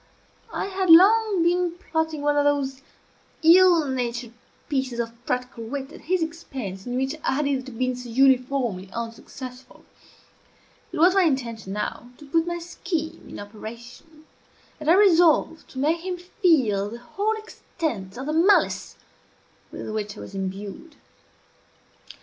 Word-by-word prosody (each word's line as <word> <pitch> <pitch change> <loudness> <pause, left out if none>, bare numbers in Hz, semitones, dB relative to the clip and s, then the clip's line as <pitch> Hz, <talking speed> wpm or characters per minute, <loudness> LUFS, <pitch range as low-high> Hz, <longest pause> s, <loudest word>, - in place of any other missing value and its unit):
I - - -2
had 380 -2 -2
long 395 +2 +7
been 350 0 +2
plotting 320 -4 -2
one 295 0 +2
of 290 - +3
those 275 -2 0 0.6
ill 340 -1 +6
natured 240 -2 -3 0.4
pieces 260 -4 -2
of 230 -1 -2
practical 250 -2 -3
wit 270 +4 -5
at - - -12
his 360 +1 0
expense 260 - -6
in 245 0 -2
which 265 +2 0
I - - +1
had 295 +2 0
hitherto 265 -2 -2
been 255 +2 -1
so 245 -1 -8
uniformly 250 -6 +2
unsuccessful. 250 +2 -8 1.1
It 350 - -5
was 350 +4 +5
my 390 - +4
intention, 235 - -1
now, 210 +3 -4
to 295 - -13
put 325 +4 +1
my 345 0 -2
scheme 335 -1 -5
in - - -8
operation, 235 +9 -11 0.5
and 305 0 -2
I 340 - +7
resolved 345 -5 +4
to - - -13
make 315 +5 +1
him 365 0 -4
feel 275 - +1
the 235 - -7
whole 400 - -2
extent 305 - -5
of 260 - -5
the 305 - -2
malice 355 +6 +3 0.8
with - - -7
which 210 -1 -4
I - - -8
was - - -10
imbued. 195 - -6
280 Hz, 150 wpm, -24 LUFS, 235-335 Hz, 1.1 s, long